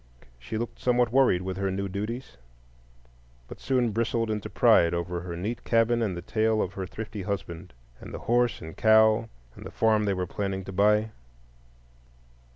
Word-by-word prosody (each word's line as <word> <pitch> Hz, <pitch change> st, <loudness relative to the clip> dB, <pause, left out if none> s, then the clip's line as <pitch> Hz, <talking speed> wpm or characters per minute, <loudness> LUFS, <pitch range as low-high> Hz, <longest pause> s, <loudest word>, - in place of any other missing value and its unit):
She 60 Hz, -, -5 dB
looked 120 Hz, +1 st, -5 dB
somewhat 125 Hz, -2 st, +2 dB
worried 125 Hz, -9 st, +3 dB
with 95 Hz, 0 st, -4 dB
her 100 Hz, 0 st, -1 dB
new 100 Hz, +1 st, -2 dB
duties, 105 Hz, -, -5 dB, 1.1 s
but -, -, -10 dB
soon 125 Hz, -4 st, +1 dB
bristled 115 Hz, +1 st, -1 dB
into 105 Hz, -2 st, -4 dB
pride 85 Hz, 0 st, +4 dB
over 85 Hz, 0 st, -3 dB
her 85 Hz, -1 st, -6 dB
neat 105 Hz, +7 st, -4 dB
cabin 115 Hz, +1 st, +2 dB
and 100 Hz, -6 st, -1 dB
the 85 Hz, -, -7 dB
tale 110 Hz, +2 st, +1 dB
of 95 Hz, -, -2 dB
her 95 Hz, -2 st, -5 dB
thrifty 105 Hz, 0 st, -7 dB
husband, 95 Hz, -4 st, -5 dB, 0.3 s
and -, -, -10 dB
the -, -, -6 dB
horse 120 Hz, 0 st, +1 dB
and 80 Hz, 0 st, -9 dB
cow, 110 Hz, +1 st, +4 dB, 0.3 s
and -, -, -11 dB
the -, -, -7 dB
farm 110 Hz, -1 st, +2 dB
they 100 Hz, -1 st, 0 dB
were 90 Hz, 0 st, -2 dB
planning 95 Hz, +1 st, -3 dB
to 95 Hz, -, -8 dB
buy. 105 Hz, +3 st, +2 dB
105 Hz, 175 wpm, -27 LUFS, 95-115 Hz, 1.1 s, pride